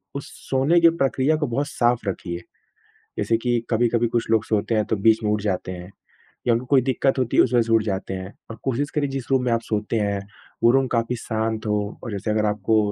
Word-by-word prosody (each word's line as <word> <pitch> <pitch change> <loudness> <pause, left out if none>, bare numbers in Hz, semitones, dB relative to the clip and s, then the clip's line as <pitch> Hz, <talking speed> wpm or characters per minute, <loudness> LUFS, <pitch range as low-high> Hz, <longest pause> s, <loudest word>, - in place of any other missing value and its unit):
उस 140 - -5 0.2
सोने 135 +6 +3
की 170 - +8
प्रक्रिया 140 -2 +1
को 150 -1 -1
बहुत 140 +4 -1
साफ़ 120 -5 0
रखिए। 85 -2 -5 0.8
जैसे 115 - +2
कि 120 +1 0
कभी-कभी 120 0 +2
कुछ 115 -1 -1
लोग 110 -1 +3
सोते 110 +1 0
हैं, 110 -1 +2
तो 110 - -1
बीच 110 +2 +3
में 105 - +1
उठ 105 0 +1
जाते 95 -3 -2
हैं 90 0 -9 0.6
या 120 - +5
उनको 120 +2 -1
कोई 130 0 +4
दिक्कत 135 +1 +1
होती 125 -2 0
है - - +8
उस 125 - -1
वज़ह 120 - +5
से 115 - +1
उठ 110 -1 +4
जाते 95 -2 -3
हैं। 95 +1 -6 0.2
और 115 - -6
कोशिश 135 +2 -1
करिए 145 -2 -1
जिस 135 -1 -5
रूम 130 -1 +3
में 125 - 0
आप 115 0 +1
सोते 105 +1 -2
हैं, 100 -1 0 0.4
वो 115 - +7
रूम 135 +1 +3
काफ़ी 115 0 0
शांत 110 -1 -3
हो 105 -1 -2
और 120 - -5
जैसे 100 +1 -2
अगर 110 0 +1
आपको 105 +1 +1
115 Hz, 235 wpm, -23 LUFS, 105-130 Hz, 0.8 s, की